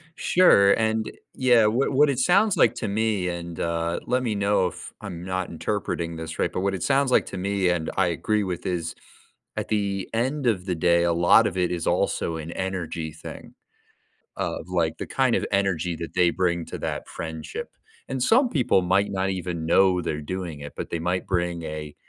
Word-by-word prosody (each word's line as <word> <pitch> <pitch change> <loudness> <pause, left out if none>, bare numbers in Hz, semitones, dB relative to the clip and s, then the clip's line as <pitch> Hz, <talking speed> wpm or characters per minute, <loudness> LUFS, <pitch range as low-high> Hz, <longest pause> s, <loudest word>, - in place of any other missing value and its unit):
Sure, 100 - +5
and 110 0 0 0.2
yeah, 120 -4 +4
what 120 +7 +1
what 145 +2 +5
it 135 -3 0
sounds 180 +8 +3
like - - +4
to 110 - -3
me, 105 -3 0
and, 85 -1 -6
uh, 85 0 -1
let 125 +1 0
me 110 -4 -1
know 100 -2 +2
if 90 0 -8
I'm 90 -5 -7
not 95 0 -3
interpreting 85 -2 -3
this 80 0 -6
right, - - +1
but - - -3
what 100 0 0
it 95 - -4
sounds 140 -1 +2
like - - +4
to 95 - -6
me, 95 0 0
and 85 -2 -1
I 95 -1 +3
agree 105 +5 0
with 90 -3 -4
is, 85 -2 -2 0.6
at - - -3
the 100 -3 -1
end 130 +4 0
of 95 -6 +1
the 90 -2 -1
day, 85 +1 +3
a 85 0 +2
lot 85 +6 +5
of 95 - -4
it 90 -1 +1
is 85 -2 -2
also 80 - 0
an 80 +1 -6
energy 85 -4 -4
thing. - - -10 0.8
Of, - - -3
like, 85 -3 0
the - - -4
kind 130 -3 +1
of - - -1
energy 90 -4 +1
that 85 0 -7
they 90 -2 +4
bring 85 -1 0
to - - -7
that - - -4
friendship, 80 -1 -6 0.4
and 130 -1 -2
some 245 - +4
people 130 - +2
might 95 +3 +2
not 95 0 0
even 90 -3 -3
know 90 +1 +4
they're 75 -3 -3
doing 85 -2 -5
it, 75 0 -8
but - - -5
they 85 - -2
might 90 +2 -1
bring 85 -2 -1
a 75 -1 -6
90 Hz, 205 wpm, -25 LUFS, 85-105 Hz, 0.8 s, Sure